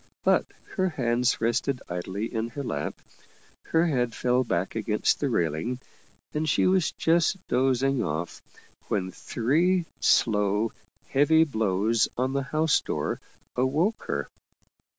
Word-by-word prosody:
But - - +3 0.3
her 185 -1 +2
hands 125 -5 +1
rested 120 +3 0
idly 95 +4 -3
in 115 0 -1
her 140 +4 -5
lap, - - -3 0.7
her 165 +1 +2
head 125 -7 0
fell 125 +1 +2
back 95 -5 -1
against 110 -1 +1
the 140 - 0
railing, 100 - -1 0.5
and 155 +1 -1
she - - +3
was 185 -2 +3
just 170 +3 +2
dozing 130 +1 +2
off 80 +3 -4 0.5
when 95 -2 -1
three 165 - +1
slow, 105 0 +2 0.4
heavy 155 +4 +5
blows 110 -4 +1
on 130 +2 0
the 140 - +1
house 155 +3 +2
door - - -3 0.3
awoke 150 - +1
her. - - -2
125 Hz, 130 wpm, -26 LUFS, 110-150 Hz, 0.7 s, heavy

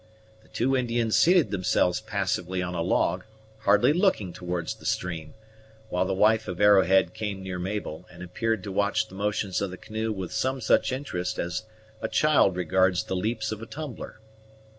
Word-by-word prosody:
The - - -24
two 135 +3 0
Indians 120 -3 0
seated 175 -2 +4
themselves 90 -2 +1
passively 90 +1 -2
on 90 0 -4
a 85 - -2
log, 90 +1 +1 0.4
hardly 105 +6 +4
looking 170 - +1
towards 90 -1 -3
the - - -16
stream, 85 -2 -3 0.5
while 90 +1 0
the 95 - -1
wife 110 +2 +3
of 90 - -5
Arrowhead 95 -3 +5
came 105 -3 -4
near 90 -1 -5
Mabel, 90 -3 -4
and 90 0 -10
appeared 110 +3 -2
to 100 - -5
watch 105 +3 0
the - - -15
motions 100 -1 -1
of 100 - -1
the 90 - -8
canoe 110 +2 -4
with 95 -4 -5
some 130 +1 -1
such 115 - +2
interest 125 -10 -3
as 90 +5 -3 0.4
a - - -1
child 110 -5 +3
regards 90 +1 +2
the 95 - -4
leaps 110 +3 -2
of 110 0 -5
a 115 - -7
tumbler. 150 -7 -7
100 Hz, 180 wpm, -26 LUFS, 90-110 Hz, 0.5 s, Arrowhead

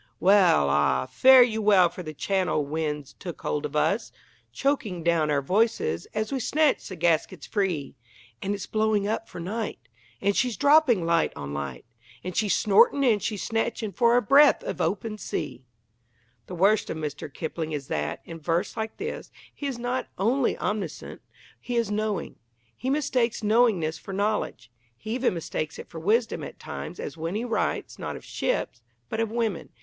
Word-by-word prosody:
Well, 185 - +5
ah, 70 -3 +2
fare 260 -1 +7
you 220 -2 -1
well 200 -4 +6
for 175 +2 -8
the 155 -3 -7
Channel 185 -4 0
wind's 150 -1 -3
took 175 -3 -8
hold 150 - -1
of 150 - -12
us, 200 +8 +1 0.4
Choking 220 - -1
down 165 -2 +2
our 140 -2 +1
voices 185 - +1
as 215 +2 -1
we 270 - -1
snatch 300 +4 +1
the 185 - -6
gaskets 165 -2 0
free, 185 -9 -1 0.5
And 200 +1 -1
its 200 - -6
blowing 215 -2 +1
up 225 +1 -2
for - - -8
night. 210 +6 -3 0.4
And 200 0 +1
she's 245 -6 +1
dropping 280 - +4
light 170 0 +2
on 70 0 -6
light, 70 0 -5 0.4
And 185 -1 -5
she's 210 -3 +2
snorting 215 +7 +4
and 220 -5 +3
she's 210 -4 -3
snatching 225 -1 -2
for 235 +5 +3
a 245 - +2
breath 285 - +6
of - - -4
open 215 -2 -2
sea. 130 -9 -4 0.9
The 180 - -6
worst 200 +5 +3
of - - -3
Mr. 150 -1 -5
Kipling 160 +1 -4
is 145 -3 -4
that, - - -2
in 165 -1 -8
verse 170 +4 -1
like 220 -1 -4
this, 440 +3 -5 0.2
he 285 - -5
is 265 -3 -3
not 245 +2 -2
only 240 +7 +1
omniscient; 200 -7 -4 0.4
he 245 - -5
is 230 -3 +1
knowing. 210 -4 -2 0.4
He 260 - -4
mistakes 260 -6 0
knowingness 205 -8 +2
for 195 - -8
knowledge. 200 - -2 0.3
He 215 - -7
even 250 -6 +1
mistakes 155 -2 -4
it - - -9
for 165 - -7
wisdom 220 +7 +1
at - - -8
times, - - -7
as - - -6
when 165 +4 -3
he 225 +3 -2
writes, 230 - -2
not - - -4
of - - -10
ships, - - -2 0.3
but 220 - -4
of 225 -1 0
women. 225 -5 -2
205 Hz, 180 wpm, -26 LUFS, 165-230 Hz, 0.9 s, fare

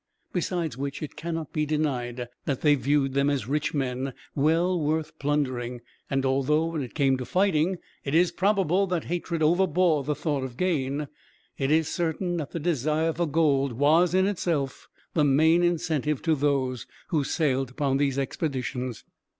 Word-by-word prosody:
Besides 170 -7 -2
which, 140 +2 -4
it 150 - -7
cannot 165 -2 -4
be 155 - +1
denied 130 -6 -1 0.2
that 135 -3 -2
they 150 -1 +5
viewed 135 0 +1
them 140 +1 +2
as 135 -6 -1
rich 150 +2 -1
men, 130 -1 -2 0.2
well 165 +5 +2
worth 155 0 -2
plundering; 130 -4 -1 0.3
and 135 -1 0
although, 140 +4 +2
when 160 -3 -2
it 125 - -7
came 135 -3 +3
to 130 - -4
fighting, 180 +2 +2 0.3
it 140 +2 -2
is 175 +1 +4
probable 195 0 +2
that 175 -3 -1
hatred 170 -1 -2
overbore 170 -2 +3
the 150 +2 -1
thought 145 -4 -1
of 125 -2 -6
gain, 150 -5 0 0.5
it 135 -1 0
is 160 0 +3
certain 175 +1 -1
that 150 -4 -4
the 170 - -4
desire 155 0 0
for 170 +1 -1
gold 140 -4 +2
was, 160 +7 +3
in 190 0 +4
itself, 165 -9 -2 0.3
the 155 - +3
main 160 +5 +4
incentive 160 -4 0
to 165 - +3
those 135 -4 0 0.2
who 155 -4 +1
sailed 135 -3 0
upon 135 0 0
these 140 -1 +1
expeditions. 130 - -3
150 Hz, 165 wpm, -26 LUFS, 135-165 Hz, 0.5 s, they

